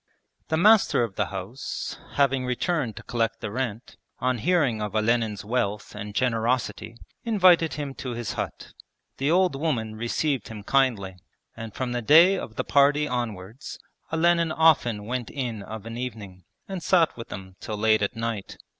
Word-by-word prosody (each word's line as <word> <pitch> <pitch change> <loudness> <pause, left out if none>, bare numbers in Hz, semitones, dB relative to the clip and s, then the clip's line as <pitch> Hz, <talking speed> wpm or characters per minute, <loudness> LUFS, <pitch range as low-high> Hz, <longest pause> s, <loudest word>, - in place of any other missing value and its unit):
The 160 - 0
master 210 - +5
of 115 -4 -3
the - - -1
house 100 +7 -5 0.2
having 135 -2 +2
returned 125 - -1
to - - -9
collect 115 -1 -1
the 110 -3 -5
rent, 120 -1 -4 0.2
on 130 -1 0
hearing 145 -8 +2
of 105 0 -4
Olenin's 110 -2 +1
wealth 105 -2 -2
and 105 0 -7
generosity 120 0 -1 0.3
invited 185 -7 +4
him 145 -2 -4
to 125 -2 -4
his 120 -2 -4
hut. - - -6 0.4
The 140 +2 0
old 180 -2 +3
woman 130 -8 -1
received 120 +3 -1
him 110 -2 -8
kindly, 110 -8 +1 0.4
and 110 -2 -8
from 130 -2 -2
the 120 0 -1
day 165 - +7
of 110 - -6
the - - -1
party 145 +4 +3
onwards 115 -2 -5 0.3
Olenin 170 0 +3
often 145 -10 +3
went 125 0 -3
in 120 -6 -4
of 110 +1 -8
an 115 0 -6
evening 105 -7 -7 0.2
and 190 -2 -5
sat 165 -1 +3
with 115 - -8
them 95 -1 -8
till 105 - -5
late 110 0 +3
at 100 +4 -1
night. 115 -3 -4
120 Hz, 165 wpm, -25 LUFS, 110-145 Hz, 0.4 s, day